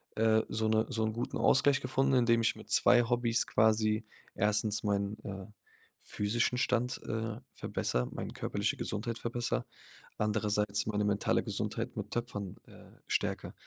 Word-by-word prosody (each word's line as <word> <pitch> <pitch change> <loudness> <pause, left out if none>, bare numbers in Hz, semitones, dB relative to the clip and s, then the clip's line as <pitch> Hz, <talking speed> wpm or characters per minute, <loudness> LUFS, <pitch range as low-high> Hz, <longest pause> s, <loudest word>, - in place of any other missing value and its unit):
äh, 110 0 +4
so 110 0 0
'ne 110 0 +2
so 110 - -1
'n 110 - -1
guten 120 +2 -3
Ausgleich 140 0 +4
gefunden, 135 +1 +1
indem 120 -2 +4
ich 115 - +2
mit - - -13
2 120 0 +5
Hobbys 120 -1 +1
quasi 110 0 +2 0.3
1. 105 +1 +1
meinen, 100 0 0
äh, 95 -1 -6 0.6
physischen 120 +4 0
Stand, 125 0 0
äh, 110 0 -2 0.2
verbessere, 60 0 -1
meine - - -5
körperliche - - -2
Gesundheit 110 +2 -3
verbessere, 120 - -2 0.5
andererseits 105 -1 0
meine 105 -1 0
mentale 100 0 +1
Gesundheit - - -3
mit - - -5
Töpfern, 105 -6 -4
äh, - - -15 0.2
stärke. - - -1
110 Hz, 145 wpm, -32 LUFS, 105-120 Hz, 0.6 s, 2